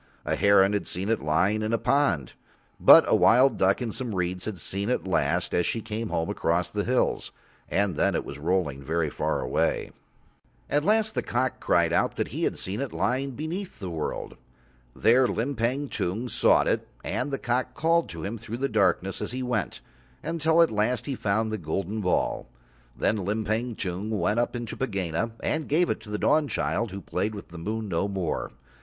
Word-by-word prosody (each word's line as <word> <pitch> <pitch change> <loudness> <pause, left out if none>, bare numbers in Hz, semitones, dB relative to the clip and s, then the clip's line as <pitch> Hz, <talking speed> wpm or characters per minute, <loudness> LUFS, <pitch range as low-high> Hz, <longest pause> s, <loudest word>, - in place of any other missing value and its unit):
A - - 0
heron 100 0 +5
had 100 - -1
seen 95 +4 -3
it 115 - +1
lying 95 +8 +1
in 110 +1 -1
a - - +3
pond, 110 - +1 0.5
but - - +9
a - - +4
wild 130 +4 +5
duck 95 +6 +3
in 115 - -3
some 120 -2 -4
reeds 90 0 -2
had 110 -3 -4
seen 100 +5 -2
it 125 - 0
last 85 -2 0
as 90 - +2
she 115 - -1
came 110 +1 -4
home 80 0 -1
across 85 +1 0
the 105 -1 -1
hills, 125 +3 0 0.4
and 100 -3 +1
then - - +1
it - - -1
was 70 - -8
rolling 75 -4 0
very 80 +1 -1
far - - -1
away. - - 0 0.8
At 145 0 +2
last 220 +2 +2
the - - 0
cock 130 +2 -1
cried - - +2
out - - +1
that - - -2
he - - -2
had - - -1
seen 100 +5 -2
it 140 - -3
lying 130 +1 -1
beneath 170 +7 -5
the 95 -3 -6
world. 80 -2 -4 0.6
There 125 +3 +4
Limpang 125 +3 -1
Tung 105 +8 -2
sought - - +3
it - - 0 0.2
and - - -2
the 135 - -2
cock 125 +1 -1
called 165 +2 +2
to 85 -2 -7
him 110 +3 -4
through 115 +1 -6
the 135 +2 0
darkness 100 -4 +1
as - - -4
he 130 0 -3
went, 110 - -2 0.4
until 165 +1 +3
at 165 - +1
last 110 +4 0
he 140 - -2
found 110 -1 0
the 110 - -3
golden 95 +6 -3
ball. 90 -2 0 0.5
Then 110 - +1
Limpang 110 +4 -1
Tung 95 +2 -3
went 110 +1 +1
up 120 - 0
into 120 -2 -5
Pegāna 100 -3 -2
and 155 0 -1
gave 170 +4 +3
it - - -2
to 110 -1 -13
the 105 - -2
Dawnchild, 115 - +1
who 100 +1 -7
played 105 +2 -2
with 100 - -9
the 85 0 -9
moon 110 +5 -3
no 95 +1 0
more. 95 -5 -3
110 Hz, 200 wpm, -26 LUFS, 95-125 Hz, 0.8 s, but